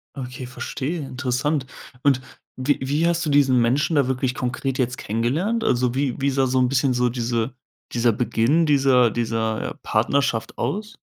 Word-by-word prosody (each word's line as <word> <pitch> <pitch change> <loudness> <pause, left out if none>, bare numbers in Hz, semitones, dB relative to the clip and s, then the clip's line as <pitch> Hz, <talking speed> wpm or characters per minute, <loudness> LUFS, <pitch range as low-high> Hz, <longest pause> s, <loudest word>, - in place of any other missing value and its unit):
Okay, 125 -1 -6
verstehe, 135 +5 -4
interessant. 135 +1 -1 0.4
Und 135 -3 +3 0.3
wie 135 +3 +1
wie 150 +5 +1
hast 170 0 0
du 150 - 0
diesen 135 -3 +4
Menschen 135 +7 +2
da 140 -3 +3
wirklich 130 -1 -1
konkret 130 +1 -2
jetzt 125 -1 -1
kennengelernt? 150 - -1
Also, 125 - +1
wie 135 -1 -1
wie 140 - +2
sah 135 0 +1
so 130 0 +1
'n 125 - +3
bisschen 135 -1 +2
so 125 0 +2
diese 120 0 -2 0.4
dieser 120 0 +3
Beginn 125 +8 +1
dieser 135 -4 +4
dieser, 110 -1 -2
äh, - - -6
Partnerschaft 115 +1 0
aus? 210 +2 -3
130 Hz, 170 wpm, -23 LUFS, 120-140 Hz, 0.4 s, diesen